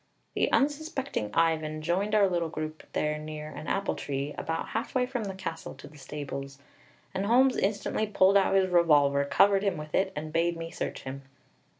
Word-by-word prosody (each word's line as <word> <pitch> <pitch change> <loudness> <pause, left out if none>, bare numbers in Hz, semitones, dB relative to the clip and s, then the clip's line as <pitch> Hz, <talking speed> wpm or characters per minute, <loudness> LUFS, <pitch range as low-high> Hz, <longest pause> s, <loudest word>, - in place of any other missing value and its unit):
The - - +1
unsuspecting 280 - 0
Ivan 155 -2 +1
joined 195 +6 0
our 205 -2 +5
little 170 -3 -1
group 155 0 -5
there 150 0 0
near 155 0 -6
an - - -8
apple 200 0 0
tree, 140 +1 -4
about 165 0 -3
halfway 255 -1 -1
from 250 -3 -3
the 195 -1 -5
castle 165 -6 -6
to 135 - -12
the 150 0 -15
stables; 140 0 -6 0.6
and 195 +1 -1
Holmes 255 +3 +5
instantly 210 +2 0
pulled 195 -1 +4
out 195 -1 +4
his 190 -1 +3
revolver, 145 -5 +4
covered 195 +6 +4
him 200 -4 0
with 150 0 -8
it, 190 0 +2
and 155 +1 -5
bade 170 +1 +1
me 165 0 -6
search - - -4
him. 135 +1 -6
165 Hz, 185 wpm, -28 LUFS, 150-200 Hz, 0.6 s, our